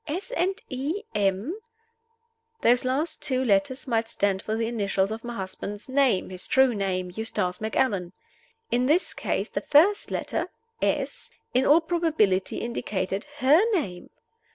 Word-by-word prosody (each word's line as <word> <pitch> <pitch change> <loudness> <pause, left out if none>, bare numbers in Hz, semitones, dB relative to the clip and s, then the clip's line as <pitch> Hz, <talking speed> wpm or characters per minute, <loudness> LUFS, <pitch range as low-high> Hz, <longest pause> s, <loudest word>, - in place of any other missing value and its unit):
"S. 360 +10 -4
and 380 -4 0
E. 285 +9 -3
M.?" 200 - 0 1.1
Those 245 +1 +4
last 285 +6 -1
two 260 -1 0
letters 220 +6 +1
might 225 -2 +1
stand 200 -3 0
for 215 - -2
the 225 0 0
initials 200 -3 0
of 225 +1 -5
my 240 0 -5
husband's 200 +1 -6
name 260 -9 +2
his 185 0 -5
true 265 -2 +4
name 185 -3 -2
Eustace 185 -4 -2
Macallan. 210 -5 0 0.6
In 245 +1 +2
this 330 +6 +2
case - - -2
the - - -3
first 360 +8 +4
letter - - -2 0.3
("S.") - - -1 0.2
in 255 +2 +3
all 310 +4 +6
probability 315 - +1
indicated 205 -4 -3 0.2
her 280 +5 +6
name. 190 - -2
235 Hz, 145 wpm, -26 LUFS, 195-280 Hz, 1.1 s, all